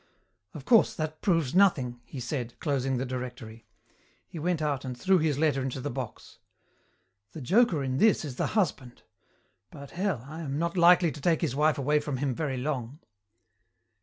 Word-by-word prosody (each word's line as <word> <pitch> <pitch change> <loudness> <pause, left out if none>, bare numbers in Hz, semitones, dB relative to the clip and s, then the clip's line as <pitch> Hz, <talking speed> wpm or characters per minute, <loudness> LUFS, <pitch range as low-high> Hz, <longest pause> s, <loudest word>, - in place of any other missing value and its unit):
"Of 140 -4 -9
course, 225 +5 +4
that 155 -1 -4
proves 165 -8 +1
nothing," 140 -11 +3
he 135 - -8
said, 125 -1 -5
closing 135 -3 -1
the 130 - -2
directory. 125 -3 -7 0.6
He 165 - -8
went 175 +1 0
out 145 -3 -1
and 130 -2 -6
threw 190 +5 +3
his 155 -3 0
letter 145 -3 +1
into 130 0 -3
the 145 +3 -4
box. 125 -3 -8 0.9
"The 155 - -8
joker 185 - +3
in 130 -1 -2
this 215 -6 +3
is 130 -4 -7
the - - 0
husband. 145 - -2 0.7
But 140 -2 -11
hell, 180 - -2
I 160 +3 -7
am 140 -3 -4
not 170 +2 -1
likely 175 -1 +5
to 145 - -10
take 165 0 +2
his 150 -7 -1
wife 150 +1 +2
away 150 +2 +2
from 145 -2 -4
him 135 0 -1
very 135 -1 -3
long." 130 -1 -3
145 Hz, 180 wpm, -28 LUFS, 130-165 Hz, 0.9 s, likely